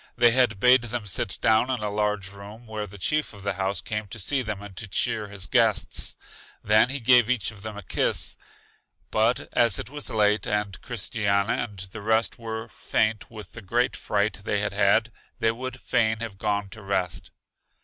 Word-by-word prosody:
They 120 -1 +6
then 120 -4 +3
bade 125 +5 +6
them 120 -1 -4
sit 95 0 -1
down 110 +3 +3
in 130 - 0
a 105 -1 -2
large 105 -2 -1
room, 100 +4 -11
where 110 -2 -5
the 100 +1 -12
chief 150 +11 -1
of 100 - -12
the 100 0 -1
house 95 -1 0
came 105 +5 -4
to 100 - -7
see 130 +7 0
them 110 -4 -4
and 100 -2 -10
to 110 - -3
cheer 110 +1 -1
his 100 -2 -6
guests. - - +1 0.5
Then 110 +3 +5
he 140 +1 -3
gave 120 -1 +5
each 115 -8 0
of 105 -3 -13
them 110 -1 -7
a 105 - -8
kiss. - - +2 0.8
But 110 +3 +1
as 115 -5 +3
it 115 - -6
was 145 -1 -3
late, 105 -1 +2
and 105 -2 -2
Christiana 100 -3 0
and 110 -5 -4
the 95 +3 -8
rest 110 +4 +1
were 110 0 -5
faint 110 -1 -1
with 105 -4 -10
the 115 - -10
great 120 +5 0
fright 105 0 -1
they 100 - 0
had 105 0 -1
had, 105 +3 +3 0.3
they 115 - +2
would 130 +2 -6
fain 110 -3 +1
have 105 -4 -6
gone 100 -1 -1
to 110 +3 -10
rest. 95 -3 -2
110 Hz, 200 wpm, -25 LUFS, 100-115 Hz, 0.8 s, They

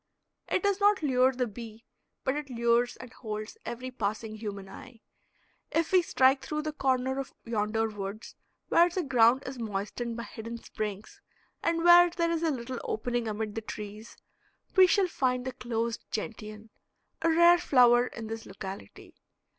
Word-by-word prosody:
It - - 0
does 400 -1 +1
not 405 -4 +3
lure 260 -2 +4
the 250 -1 -1
bee, 225 0 -10 0.4
but 265 0 0
it 295 -2 -5
lures 235 0 +1
and 255 -2 -11
holds 215 -2 -6
every 255 +2 -5
passing 215 -1 -3
human 205 -3 -6
eye. 230 +4 -12 0.7
If 330 0 0
we 370 -1 +6
strike 265 -5 +3
through 305 0 -3
the 310 - -2
corner 265 -1 0
of 275 - -6
yonder 225 0 0
woods, 205 0 -7 0.4
where 345 +1 +5
the 355 +1 -2
ground 255 -1 +4
is 260 -1 -6
moistened 225 +2 -4
by 235 - -4
hidden 230 +1 -7
springs 210 -2 -6 0.4
and 335 0 0
where 350 0 +8
there 335 -1 -1
is 330 -1 -1
a 330 - +1
little 255 -3 -4
opening 240 +1 -2
amid 215 0 -3
the 225 - -4
trees, 210 0 -8 0.6
we 375 -1 +8
shall 385 +2 +3
find 250 -6 -1
the 260 - -2
closed 235 -2 -3
gentian, 215 0 -6 0.5
a 330 - +2
rare 340 +2 +6
flower 245 -4 +5
in 230 - -8
this 225 0 -6
locality. 190 - -9
240 Hz, 165 wpm, -29 LUFS, 220-275 Hz, 0.7 s, where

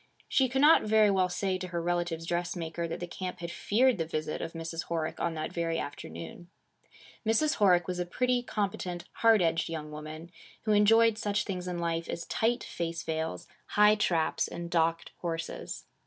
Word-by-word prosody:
She 265 -2 +3
could 265 +2 +1
not 305 +3 +7
very 215 -1 +4
well 185 -2 +2
say 185 +1 -1
to 185 - -4
her 170 -1 -3
relative's 175 -1 -1
dressmaker, 170 -1 -2
that 165 - -5
the 175 - -3
camp 180 +1 -5
had 170 0 -6
feared 240 +2 +2
the 165 - 0
visit 155 -1 -3
of 165 - -5
Mrs. 165 0 -5
Horick 165 -2 -2
on 170 -1 -1
that 155 0 -4
very 165 -1 -1
afternoon. 85 - -7 0.7
Mrs. 225 +8 +2
Horick 180 -5 +4
was 180 -1 -3
a 180 - 0
pretty, 250 +6 +1
competent, 200 -6 -3
hard 225 -4 +5
edged 165 0 +1
young 155 -2 -5
woman, 155 +2 -8 0.3
who 215 - 0
enjoyed 220 +2 +5
such 210 0 0
things 180 -2 -4
in 180 -1 -3
life 165 -1 -2
as 170 - -4
tight 235 +2 0
face 165 -1 -4
veils, 160 0 -3 0.3
high 210 0 +7
traps, 175 -6 +1
and 170 0 -6
docked 165 0 +1
horses. 165 -2 -4
175 Hz, 185 wpm, -30 LUFS, 165-210 Hz, 0.7 s, not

